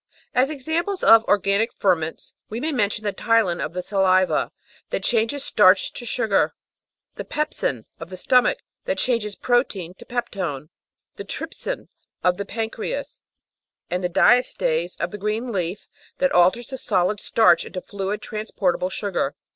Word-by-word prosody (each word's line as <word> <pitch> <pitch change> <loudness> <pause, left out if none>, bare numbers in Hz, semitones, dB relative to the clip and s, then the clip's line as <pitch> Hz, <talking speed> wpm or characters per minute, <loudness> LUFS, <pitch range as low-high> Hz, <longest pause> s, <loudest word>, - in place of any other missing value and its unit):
As 255 +2 +3
examples 320 +7 -2
of 225 0 +8
organic 205 +3 +2
ferments 165 -5 -1 0.2
we 220 - -4
may 315 +5 -1
mention 210 -5 0
the 205 -1 -1
ptyalin 220 -7 +1
of - - -4
the 180 0 -4
saliva 185 -1 +2 0.4
that - - -3
changes 240 +4 +1
starch - - +5
into - - -6
sugar, - - +1 0.6
the - - -4
pepsin 220 - -2
of 165 - -8
the 185 - -8
stomach 250 - +3 0.3
that - - -1
changes 220 -5 +1
protein 230 -8 0
into 185 - -14
peptone, 175 - -4 0.5
the - - -5
trypsin - - -5 0.4
of 180 -1 +3
the 200 - -4
pancreas, 225 - -4 0.7
and 180 +1 -1
the 180 - 0
diastase 175 -5 +2
of 170 +1 -2
the 210 - -7
green 215 +4 -2
leaf 180 -1 -3 0.3
that 275 - +2
alters 185 +7 +3
the 265 -1 -5
solid 195 -1 +1
starch 225 +2 +4
into 185 - -6
fluid 200 +2 -4
transportable 200 -4 -1
sugar. 190 -7 -2
205 Hz, 150 wpm, -23 LUFS, 180-240 Hz, 0.7 s, of